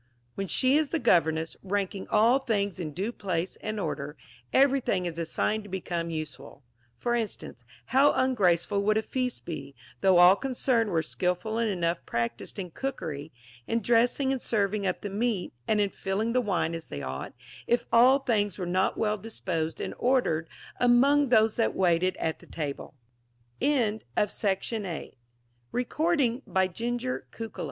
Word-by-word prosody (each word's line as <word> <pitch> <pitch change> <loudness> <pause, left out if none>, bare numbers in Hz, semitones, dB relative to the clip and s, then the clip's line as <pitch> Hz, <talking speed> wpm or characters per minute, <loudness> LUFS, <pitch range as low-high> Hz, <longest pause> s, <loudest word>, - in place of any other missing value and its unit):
When 195 - -4
she 260 +8 +3
is 305 -3 -1
the 330 - 0
governess, 160 - +2
ranking 195 0 -2
all 230 +5 +4
things 200 -7 -1
in 160 -4 -4
due 190 +9 -3
place 185 -5 -3
and 215 0 -4
order, 145 -5 -4 0.3
every 275 0 +4
thing 185 -6 0
is 170 -1 -4
assigned 190 +6 0
to 205 - -12
be 190 +1 -3
come 170 -1 -3
useful; 145 -4 -7 0.3
for 240 - -1
instance, 220 - -4 0.2
how 270 +3 +5
uni^raceful 200 -6 +2
would 215 +1 +2
a 220 - +1
feast 250 0 -3
be, 140 -4 -6 0.2
though 190 -2 +4
all 175 +2 +8
concerned 245 -2 0
were 165 -4 +1
skilful 180 +7 -2
and 230 -1 +1
enough 170 -3 -1
practised 115 - -3
in 180 -3 -5
cookery, 160 - -5 0.4
in 230 - +1
dressing 240 +4 +2
and 265 -2 -1
serving 205 -2 0
up 185 - -2
the 205 - -4
meat, 210 -2 -1
and 215 - +2
in 200 -1 +1
fill 195 +1 -3
ing 230 +2 0
the 255 - +3
wine 170 -7 0
as 165 -1 -6
they 70 -1 -6
ought, 65 +1 -5 0.3
if 240 - +2
all 250 +4 +7
things 215 -8 0
were 185 - -3
not 185 +2 +1
well 210 -1 0
disposed 170 -7 -3
and - - -4
ordered 240 -11 +1 0.3
among 270 +3 +4
those 220 -2 +4
that 230 - +1
wai 175 -3 +3
200 Hz, 145 wpm, -28 LUFS, 170-235 Hz, 0.4 s, all